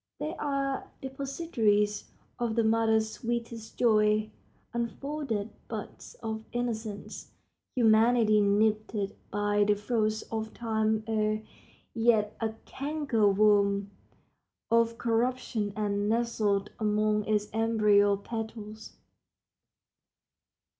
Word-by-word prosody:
They 310 Hz, -, -3 dB
are 275 Hz, -2 st, -2 dB
depositories 265 Hz, -7 st, 0 dB, 0.3 s
of 235 Hz, -2 st, -1 dB
the 230 Hz, -, +3 dB
mother's 220 Hz, 0 st, +2 dB
sweetest 235 Hz, -1 st, -5 dB
joy, 215 Hz, -2 st, +3 dB, 0.4 s
unfolded 235 Hz, -2 st, -3 dB, 0.2 s
buds -, -, -7 dB
of 220 Hz, 0 st, -3 dB
innocence, 225 Hz, -4 st, -4 dB, 0.5 s
humanity 225 Hz, -2 st, +4 dB
nipped 215 Hz, +2 st, +2 dB, 0.3 s
by 205 Hz, 0 st, +1 dB
the 205 Hz, 0 st, +3 dB
frosts 215 Hz, 0 st, -1 dB
of 220 Hz, -1 st, -4 dB
time 220 Hz, -1 st, 0 dB
ere 215 Hz, -1 st, 0 dB, 0.5 s
yet 225 Hz, -2 st, +2 dB
a 220 Hz, -1 st, -1 dB
canker 275 Hz, -7 st, 0 dB
worm 200 Hz, -1 st, +3 dB, 0.8 s
of 230 Hz, 0 st, +3 dB
corruption 235 Hz, -2 st, 0 dB
has 210 Hz, -1 st, 0 dB
nestled 210 Hz, -1 st, 0 dB
among 210 Hz, 0 st, +1 dB
its 210 Hz, -1 st, +1 dB
embryo 210 Hz, -2 st, +4 dB
petals. 220 Hz, 0 st, -7 dB
220 Hz, 90 wpm, -29 LUFS, 210-235 Hz, 0.8 s, humanity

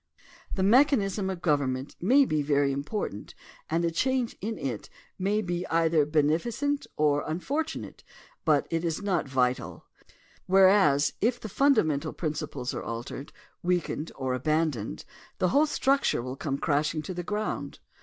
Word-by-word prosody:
The 190 Hz, -, 0 dB
mechan 265 Hz, +6 st, +5 dB
ism 195 Hz, -1 st, -2 dB
of 185 Hz, -2 st, -5 dB
government 140 Hz, -3 st, 0 dB
may 265 Hz, +10 st, +5 dB
be 155 Hz, -, 0 dB
very 145 Hz, -1 st, +2 dB
important 140 Hz, -, -4 dB, 0.3 s
and 170 Hz, +2 st, +1 dB
a 170 Hz, -, +1 dB
change 255 Hz, +7 st, 0 dB
in 220 Hz, +3 st, -3 dB
it 125 Hz, -6 st, -4 dB, 0.3 s
may 205 Hz, +3 st, +1 dB
be 175 Hz, 0 st, -2 dB
either 165 Hz, -2 st, +2 dB
beneficent 170 Hz, -, 0 dB
or 145 Hz, -1 st, +2 dB
imfortunate, 280 Hz, -, -3 dB, 0.4 s
but 150 Hz, -3 st, +3 dB
it 165 Hz, 0 st, 0 dB
is 165 Hz, +3 st, -2 dB
not 185 Hz, -7 st, 0 dB
vital, 130 Hz, -1 st, -1 dB, 0.6 s
whereas, 185 Hz, -7 st, +5 dB
if 235 Hz, +3 st, +1 dB
the -, -, -6 dB
fundamental 200 Hz, -, +2 dB
principles 150 Hz, -5 st, -4 dB
are -, -, -4 dB
altered, 120 Hz, +4 st, -6 dB, 0.3 s
weakened, 175 Hz, -3 st, -1 dB
or 130 Hz, -1 st, -2 dB
abandoned 150 Hz, -3 st, -1 dB, 0.3 s
the 185 Hz, -, +2 dB
whole 290 Hz, -, +4 dB
structure 275 Hz, -, +1 dB
will 130 Hz, +1 st, -5 dB
come 140 Hz, 0 st, -3 dB
crashing 150 Hz, +2 st, 0 dB
to 185 Hz, -, -5 dB
the 175 Hz, -, -4 dB
ground. 210 Hz, +4 st, -3 dB
165 Hz, 145 wpm, -28 LUFS, 145-205 Hz, 0.6 s, mechan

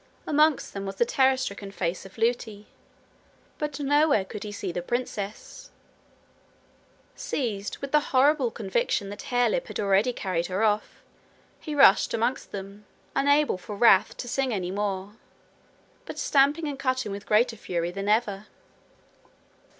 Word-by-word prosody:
Amongst 300 Hz, -1 st, +2 dB
them 195 Hz, 0 st, -5 dB
was 195 Hz, -, -5 dB
the 240 Hz, -, +2 dB
terror 265 Hz, +2 st, +3 dB
stricken 200 Hz, -5 st, -5 dB
face 185 Hz, -1 st, -3 dB
of 190 Hz, -, -19 dB
Lootie; 225 Hz, -2 st, -1 dB, 0.9 s
but 295 Hz, -1 st, -3 dB
nowhere 290 Hz, -6 st, +3 dB
could 205 Hz, +2 st, -8 dB
he 210 Hz, -, -6 dB
see 200 Hz, -2 st, -4 dB
the 175 Hz, -, -3 dB
princess. 210 Hz, -1 st, -5 dB, 1.5 s
Seized 210 Hz, -7 st, -3 dB
with 275 Hz, -1 st, -7 dB
the 300 Hz, -, +5 dB
horrible 275 Hz, -1 st, +3 dB
conviction 205 Hz, -2 st, -1 dB
that 205 Hz, 0 st, -8 dB
Harelip 255 Hz, -, +1 dB
had -, -, -6 dB
already 200 Hz, +4 st, +2 dB
carried 180 Hz, -7 st, -2 dB
her 190 Hz, +3 st, -1 dB
off, 210 Hz, -1 st, 0 dB, 0.6 s
he 305 Hz, -2 st, -5 dB
rushed 275 Hz, -9 st, +5 dB
amongst 235 Hz, +3 st, -1 dB
them, 200 Hz, +1 st, -8 dB, 0.3 s
unable 285 Hz, -7 st, +3 dB
for 205 Hz, +3 st, -8 dB
wrath 200 Hz, -2 st, +4 dB
to 245 Hz, -, -6 dB
sing 265 Hz, +1 st, -1 dB
any 185 Hz, -4 st, -2 dB
more, 200 Hz, +1 st, -3 dB, 0.9 s
but -, -, -7 dB
stamping 290 Hz, +3 st, +2 dB
and 280 Hz, -2 st, -5 dB
cutting 255 Hz, -5 st, -1 dB
with 200 Hz, 0 st, -7 dB
greater 225 Hz, +2 st, +3 dB
fury 175 Hz, -4 st, -3 dB
than 195 Hz, +2 st, -4 dB
ever. 210 Hz, -2 st, 0 dB
215 Hz, 145 wpm, -26 LUFS, 195-265 Hz, 1.5 s, the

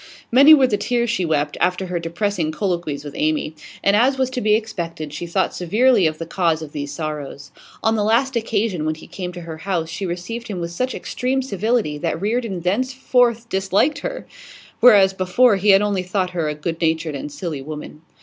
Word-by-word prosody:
Many 280 Hz, +6 st, +9 dB
were 270 Hz, -3 st, +4 dB
the 220 Hz, -5 st, +1 dB
tears 240 Hz, -2 st, 0 dB
she 185 Hz, -5 st, 0 dB
wept 150 Hz, -2 st, 0 dB
after 180 Hz, +1 st, +1 dB
her 180 Hz, -1 st, -3 dB
depressing 170 Hz, 0 st, -2 dB
colloquies 170 Hz, -5 st, -2 dB
with 145 Hz, -1 st, -8 dB
Amy; 155 Hz, 0 st, 0 dB, 0.3 s
and, 200 Hz, -, +4 dB
as 260 Hz, +5 st, +3 dB
was 260 Hz, -1 st, 0 dB
to 255 Hz, -1 st, -3 dB
be 210 Hz, 0 st, +4 dB
expected, 170 Hz, -9 st, -4 dB
she 170 Hz, +3 st, -5 dB
thought 185 Hz, +3 st, 0 dB
severely 210 Hz, +2 st, +3 dB
of 155 Hz, 0 st, -3 dB
the 165 Hz, -, -5 dB
cause 165 Hz, -2 st, 0 dB
of 150 Hz, -, -9 dB
these 145 Hz, -1 st, -5 dB
sorrows. 145 Hz, -2 st, -6 dB, 0.3 s
On 225 Hz, 0 st, +3 dB
the 210 Hz, -, 0 dB
last 240 Hz, +5 st, +2 dB
occasion 220 Hz, -6 st, -1 dB
when 155 Hz, 0 st, -1 dB
he 155 Hz, -, -13 dB
came 180 Hz, -2 st, -6 dB
to 175 Hz, -, -8 dB
her 165 Hz, -1 st, -7 dB
house 165 Hz, -2 st, -2 dB
she 190 Hz, +4 st, -4 dB
received 185 Hz, +7 st, -5 dB
him 200 Hz, -5 st, -4 dB
with 170 Hz, 0 st, -4 dB
such 255 Hz, +9 st, -2 dB
extreme 260 Hz, +1 st, -2 dB
civility 215 Hz, -, -1 dB
that 160 Hz, -, -2 dB
Reardon 210 Hz, -2 st, -2 dB
thenceforth 245 Hz, +3 st, +1 dB
disliked 195 Hz, +9 st, +1 dB
her, -, -, -5 dB, 0.5 s
whereas 205 Hz, -5 st, +6 dB
before 195 Hz, +5 st, +3 dB
he 200 Hz, +2 st, +1 dB
had 195 Hz, +1 st, +6 dB
only 200 Hz, -2 st, 0 dB
thought 185 Hz, 0 st, -2 dB
her 165 Hz, -4 st, -1 dB
a 150 Hz, -, -3 dB
good 165 Hz, +2 st, -4 dB
natured 160 Hz, -1 st, 0 dB
and 145 Hz, +1 st, -6 dB
silly 155 Hz, -3 st, -5 dB
woman. 150 Hz, +1 st, -8 dB
185 Hz, 205 wpm, -21 LUFS, 160-230 Hz, 0.5 s, Many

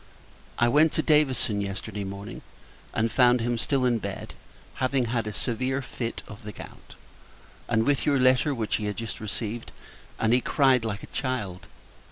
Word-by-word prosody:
I 120 Hz, -, +4 dB
went 150 Hz, +6 st, +4 dB
to 155 Hz, -, +1 dB
Davison 135 Hz, -9 st, +2 dB
yesterday 100 Hz, +1 st, -4 dB
morning; 100 Hz, +1 st, -7 dB, 0.5 s
and 115 Hz, +1 st, 0 dB
found 125 Hz, -1 st, +5 dB
him 120 Hz, 0 st, 0 dB
still 130 Hz, +2 st, +1 dB
in 120 Hz, -2 st, +2 dB
bed, -, -, -6 dB, 0.5 s
having 130 Hz, -1 st, +2 dB
had 115 Hz, -1 st, -1 dB
a -, -, -2 dB
severe 130 Hz, +5 st, -1 dB
fit 115 Hz, -2 st, -4 dB
of 105 Hz, -, -10 dB
the 105 Hz, -, -7 dB
gout, 95 Hz, -, -12 dB, 0.7 s
and 110 Hz, -1 st, +2 dB
with 145 Hz, -1 st, +2 dB
your 145 Hz, -1 st, +4 dB
letter, 130 Hz, +3 st, +4 dB
which 110 Hz, -3 st, 0 dB
he 105 Hz, -, -4 dB
had 105 Hz, -1 st, -3 dB
just 115 Hz, -1 st, -4 dB
received: 110 Hz, +2 st, -4 dB, 0.5 s
and 110 Hz, +1 st, +3 dB
he 125 Hz, -, +5 dB
cried 130 Hz, -4 st, +3 dB
like 110 Hz, -2 st, -3 dB
a -, -, -12 dB
child! 105 Hz, -9 st, -3 dB
120 Hz, 175 wpm, -27 LUFS, 110-130 Hz, 0.7 s, found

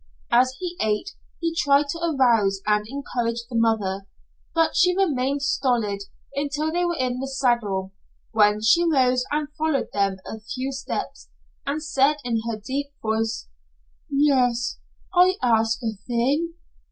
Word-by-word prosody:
As 255 Hz, +2 st, +4 dB
he 355 Hz, -1 st, -4 dB
ate, 215 Hz, -, 0 dB, 0.3 s
he 330 Hz, -1 st, 0 dB
tried 285 Hz, -3 st, +3 dB
to 335 Hz, -, -3 dB
arouse 235 Hz, -, +2 dB
and 210 Hz, 0 st, +1 dB
encourage 235 Hz, -3 st, -3 dB
the 245 Hz, -, -7 dB
mother, 205 Hz, -4 st, +1 dB, 0.5 s
but 325 Hz, -1 st, +2 dB
she 360 Hz, +1 st, +4 dB
remained 280 Hz, -6 st, +1 dB
stolid 235 Hz, -8 st, 0 dB, 0.3 s
until 290 Hz, +2 st, -1 dB
they 350 Hz, +2 st, 0 dB
were 345 Hz, -1 st, 0 dB
in 250 Hz, -2 st, -1 dB
the 270 Hz, -, -3 dB
saddle, 235 Hz, -8 st, 0 dB, 0.4 s
when 210 Hz, -1 st, +3 dB
she 285 Hz, +10 st, +5 dB
rose 255 Hz, -6 st, +3 dB
and 300 Hz, 0 st, -1 dB
followed 315 Hz, -3 st, 0 dB
them 200 Hz, -1 st, +1 dB
a 220 Hz, -, -6 dB
few 255 Hz, +5 st, -4 dB
steps, 270 Hz, 0 st, -5 dB, 0.4 s
and 300 Hz, +2 st, -2 dB
said 290 Hz, -1 st, +3 dB
in 230 Hz, -2 st, 0 dB
her 225 Hz, -, -2 dB
deep 270 Hz, +7 st, -3 dB, 0.2 s
voice: 225 Hz, 0 st, -1 dB, 0.6 s
"Yes, 260 Hz, -4 st, +2 dB, 0.3 s
I 365 Hz, +1 st, +5 dB
ask 225 Hz, -2 st, +3 dB
a 225 Hz, -1 st, -1 dB
thing. 280 Hz, +8 st, 0 dB
255 Hz, 145 wpm, -24 LUFS, 225-295 Hz, 0.6 s, she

